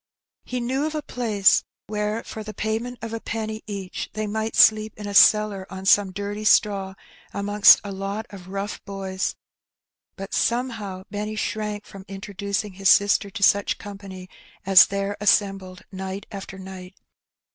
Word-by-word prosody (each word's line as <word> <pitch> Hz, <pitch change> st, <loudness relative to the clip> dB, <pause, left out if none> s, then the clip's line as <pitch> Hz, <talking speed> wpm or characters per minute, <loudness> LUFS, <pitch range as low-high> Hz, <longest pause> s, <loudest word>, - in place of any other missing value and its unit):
He 250 Hz, -, -4 dB
knew 260 Hz, +5 st, -1 dB
of 310 Hz, -, -5 dB
a 305 Hz, -, -3 dB
place 215 Hz, -7 st, +2 dB, 0.2 s
where 210 Hz, +1 st, -2 dB
for 220 Hz, -, -8 dB
the 215 Hz, 0 st, -8 dB
payment 225 Hz, +3 st, -3 dB
of 225 Hz, 0 st, -5 dB
a 225 Hz, -, -3 dB
penny 220 Hz, -1 st, -4 dB
each 195 Hz, -3 st, -5 dB
they 215 Hz, 0 st, -3 dB
might 220 Hz, +1 st, -3 dB
sleep 215 Hz, 0 st, +5 dB
in 210 Hz, -, -7 dB
a 205 Hz, -, -5 dB
cellar 205 Hz, -2 st, +5 dB
on 190 Hz, +1 st, -8 dB
some 200 Hz, -1 st, +4 dB
dirty 205 Hz, +2 st, -5 dB
straw 195 Hz, -2 st, +2 dB, 0.4 s
amongst 205 Hz, +1 st, +6 dB
a 200 Hz, -, -6 dB
lot 195 Hz, +3 st, -4 dB
of 190 Hz, -3 st, -11 dB
rough 195 Hz, +2 st, -5 dB
boys. 195 Hz, -2 st, -4 dB, 0.8 s
But 195 Hz, +1 st, -8 dB
somehow 225 Hz, -6 st, -1 dB
Benny 210 Hz, +1 st, -4 dB
shrank 210 Hz, -1 st, -3 dB
from 195 Hz, -1 st, -12 dB
introducing 200 Hz, +1 st, -4 dB
his 195 Hz, 0 st, +1 dB
sister 200 Hz, 0 st, +4 dB
to 200 Hz, 0 st, -5 dB
such 200 Hz, 0 st, +3 dB
company 195 Hz, -2 st, -10 dB, 0.4 s
as 190 Hz, -2 st, +8 dB
there 200 Hz, +1 st, -3 dB
assembled 195 Hz, -3 st, +1 dB
night 190 Hz, +1 st, -6 dB
after 195 Hz, -1 st, -8 dB
night. 190 Hz, -1 st, -10 dB
205 Hz, 155 wpm, -23 LUFS, 195-215 Hz, 0.8 s, as